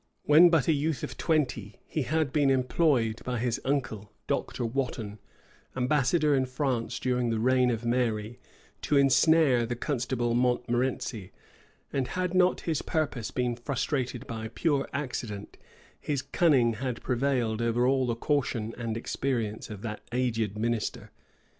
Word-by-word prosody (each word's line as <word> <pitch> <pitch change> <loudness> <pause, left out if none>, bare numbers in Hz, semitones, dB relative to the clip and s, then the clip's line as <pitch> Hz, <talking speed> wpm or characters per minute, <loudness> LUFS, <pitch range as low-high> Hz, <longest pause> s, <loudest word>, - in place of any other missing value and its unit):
When 160 +4 +7
but 165 -6 +2
a 160 - +4
youth 150 0 -1
of - - -5
twenty, 125 - -1
he 155 - -2
had 145 +1 0
been 145 -2 +3
employed 130 -3 +2
by 125 -1 -2
his 120 0 -1
uncle, 125 -7 -2
Dr. 120 - -2
Wotton, 115 -4 -3 0.6
ambassador 145 +3 +2
in 130 -2 +2
France 130 -3 -2
during 125 -2 0
the 115 - 0
reign 125 +2 +3
of 120 -1 -2
Mary, 120 -1 -1 0.4
to 145 - +1
insnare 140 -1 +4
the 120 - -2
constable 120 -2 -1
Montmorency; 120 -4 0 0.6
and 135 -2 0
had 185 -1 -2
not 185 0 +3
his 160 -4 -1
purpose 140 -8 -2
been 125 -2 -1
frustrated 125 0 -2
by 110 -1 -5
pure 140 +4 0
accident, 120 -7 -5 0.4
his 140 -3 -2
cunning 135 -9 +3
had 125 +1 -4
prevailed 125 -3 0
over 115 +1 +1
all 130 0 +2
the 120 - 0
caution 115 -4 -1
and 115 -2 -3
experience 115 -3 -2
of 105 -2 -8
that 105 -2 -5
aged 115 -4 -1
minister. 115 0 -2
125 Hz, 145 wpm, -28 LUFS, 115-140 Hz, 0.6 s, When